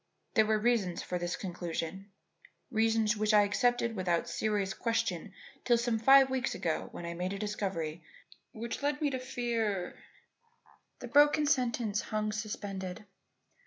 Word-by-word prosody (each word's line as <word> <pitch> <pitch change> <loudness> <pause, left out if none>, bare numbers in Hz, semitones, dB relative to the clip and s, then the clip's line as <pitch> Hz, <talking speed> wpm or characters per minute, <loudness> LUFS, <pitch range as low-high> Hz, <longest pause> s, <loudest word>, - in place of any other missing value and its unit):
There 220 -2 +4
were 215 0 +3
reasons 215 -5 +1
for 180 - -3
this 175 0 -2
conclusion 175 +1 -5 0.6
reasons 220 -2 +2
which 215 0 +2
I 205 - +7
accepted 235 +3 +1
without 175 -3 0
serious 205 -3 -1
question 225 -5 -1 0.3
till 240 -1 +4
some 235 -1 0
five 270 +3 +7
weeks 260 -1 -1
ago 165 -2 -2
when 175 - -7
I 170 - -4
made 180 +3 -3
a - - -4
discovery 190 -6 -3 0.5
which 235 +4 -5
led 290 +1 0
me 295 -3 +1
to 260 - -2
fear 230 -7 -2 0.5
" - - -32
The - - -6
broken 295 +1 +5
sentence 235 -6 +1
hung 215 -1 -2
suspended. 205 -3 -5
215 Hz, 150 wpm, -31 LUFS, 190-235 Hz, 0.6 s, I